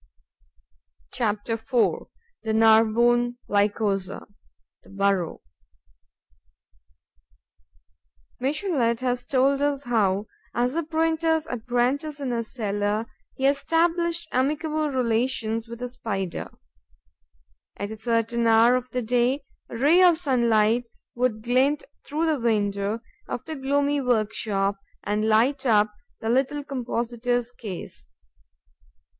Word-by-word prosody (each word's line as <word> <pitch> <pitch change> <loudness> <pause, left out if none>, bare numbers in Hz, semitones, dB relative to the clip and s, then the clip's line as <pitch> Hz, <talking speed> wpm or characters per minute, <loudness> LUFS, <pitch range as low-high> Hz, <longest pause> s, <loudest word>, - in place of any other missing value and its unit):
CHAPTER 220 -2 -1
IV: 225 +2 0 0.3
THE 220 - -2
NARBONNE 230 +2 +4
LYCOSA: 200 -2 0 0.6
THE - - -20
BURROW 195 -3 0 3.0
Michelet 260 - 0
has 250 -1 -1
told 275 +1 +2
us 285 -1 0
how, 210 -5 +1 0.3
as 245 +2 +1
a 335 - 0
printer's 320 0 +1
apprentice 250 +4 -1
in 265 -3 -2
a 230 -1 -1
cellar, 210 -1 -2 0.3
he 265 - -2
established 330 +4 +1
amicable 305 +3 0
relations 230 -3 0
with 235 +1 -8
a 250 - -3
Spider. 195 -7 -4 1.3
At 200 +2 -4
a - - -5
certain 230 +1 0
hour 225 +2 +6
of 255 0 -3
the 250 -1 -2
day, 245 +4 +1 0.3
a - - -6
ray 300 +9 +5
of 355 -3 +6
sunlight 235 -6 +2 0.3
would 240 -3 -1
glint 260 +5 +2 0.2
through 310 +3 -2
the 310 -3 +1
window 205 -1 0 0.3
of 240 - -5
the 315 - -5
gloomy 285 +1 +1
workshop 215 -4 0 0.2
and 210 +2 0
light 255 +6 +3
up 215 -4 +3 0.3
the 225 - -2
little 270 +4 +1
compositor's 245 -2 -2
case. 200 - -9
240 Hz, 110 wpm, -25 LUFS, 220-275 Hz, 3.0 s, hour